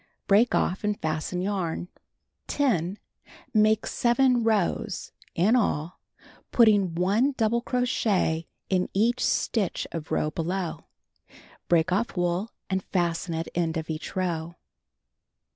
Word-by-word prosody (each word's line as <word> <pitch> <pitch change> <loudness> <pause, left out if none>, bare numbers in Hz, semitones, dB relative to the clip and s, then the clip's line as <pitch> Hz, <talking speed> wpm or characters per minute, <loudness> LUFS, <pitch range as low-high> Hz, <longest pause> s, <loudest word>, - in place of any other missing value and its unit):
Break 215 +5 +4
off 185 - 0
and 210 0 -1
fasten 160 +3 -2
yarn. 185 -4 -2 0.6
10. 200 - 0 0.6
Make 215 0 +3
7 245 0 +2
rows 215 -2 0 0.2
(in 200 +8 +3
all) 175 -8 0 0.5
putting 205 -7 +4
1 205 +11 +2
double 235 +1 +2
crochet 215 -10 0 0.2
in 185 -1 0
each 235 +5 +2
stitch 205 -6 0
of 160 -2 -6
row 155 - 0
below. 175 +2 -3 0.8
Break 170 +1 +3
off 200 +2 0
wool 175 +4 0 0.2
and 190 0 -1
fasten 170 -2 -1
at 165 +1 -3
end 165 -1 0
of 160 0 -4
each 155 +5 -6
row. 170 -2 -2
190 Hz, 120 wpm, -26 LUFS, 170-220 Hz, 0.8 s, Break